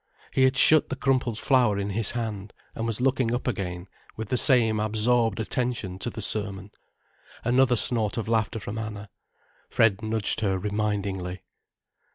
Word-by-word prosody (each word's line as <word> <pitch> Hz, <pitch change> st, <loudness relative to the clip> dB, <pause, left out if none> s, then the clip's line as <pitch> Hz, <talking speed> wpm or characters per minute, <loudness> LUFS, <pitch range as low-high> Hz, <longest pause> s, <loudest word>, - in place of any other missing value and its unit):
He 130 Hz, -, +4 dB
had 130 Hz, +1 st, +1 dB
shut 155 Hz, +3 st, +5 dB
the 130 Hz, -, -3 dB
crumpled 130 Hz, -4 st, 0 dB
flower 120 Hz, -6 st, +2 dB
in 100 Hz, 0 st, -3 dB
his 110 Hz, +1 st, +1 dB
hand 110 Hz, -4 st, -5 dB, 0.2 s
and 115 Hz, -, -4 dB
was 115 Hz, 0 st, -1 dB
looking 125 Hz, -2 st, +1 dB
up 125 Hz, -, -5 dB
again 90 Hz, -7 st, -4 dB, 0.3 s
with 110 Hz, -1 st, -6 dB
the -, -, 0 dB
same 115 Hz, -4 st, +3 dB
absorbed 110 Hz, +1 st, 0 dB
attention 110 Hz, -5 st, -3 dB
to 120 Hz, -, -2 dB
the 110 Hz, -2 st, -4 dB
sermon. 100 Hz, -2 st, -1 dB, 0.7 s
Another 125 Hz, +1 st, +3 dB
snort 110 Hz, -2 st, +4 dB
of 115 Hz, -, -3 dB
laughter 110 Hz, 0 st, -1 dB
from 105 Hz, +2 st, -6 dB
Anna. 105 Hz, -2 st, -7 dB, 0.6 s
Fred 110 Hz, -2 st, +2 dB
nudged 110 Hz, -2 st, +1 dB
her 95 Hz, -3 st, 0 dB
remindingly. 100 Hz, -2 st, -3 dB
110 Hz, 160 wpm, -25 LUFS, 100-120 Hz, 0.7 s, shut